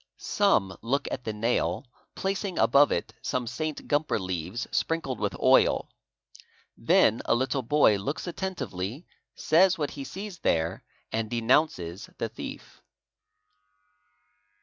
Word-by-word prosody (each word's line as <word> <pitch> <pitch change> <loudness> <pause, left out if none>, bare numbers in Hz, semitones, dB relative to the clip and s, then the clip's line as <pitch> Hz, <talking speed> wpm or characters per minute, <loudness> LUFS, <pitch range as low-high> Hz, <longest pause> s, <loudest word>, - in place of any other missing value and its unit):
'' - - -62 0.2
Some 100 - +3
look 135 +5 0
P - - -7
at 125 - -5
the 110 - -1
nail 115 +6 0 0.3
placing 195 -1 -2
above 140 +4 +5
it 85 - -2
some 125 -1 -2
St. 155 +6 -4
Gumper 145 +1 +1
leaves 95 +4 -3
sprinkled 150 -7 -1
with - - -2
oil; - - +4 0.9
then 110 - +3
a - - +3
little 130 +2 0
boy 125 -4 +4
looks 120 +10 -4
attentively, 140 - -4 0.3
says 185 +3 +4
what 145 -3 -2
he 140 - -6
sees 195 +4 -7
there, 80 - 0 0.3
and 110 -1 -2
denounces 115 - +1
_ - - -44
the - - -2
thief." - - -9
130 Hz, 135 wpm, -27 LUFS, 105-155 Hz, 0.9 s, above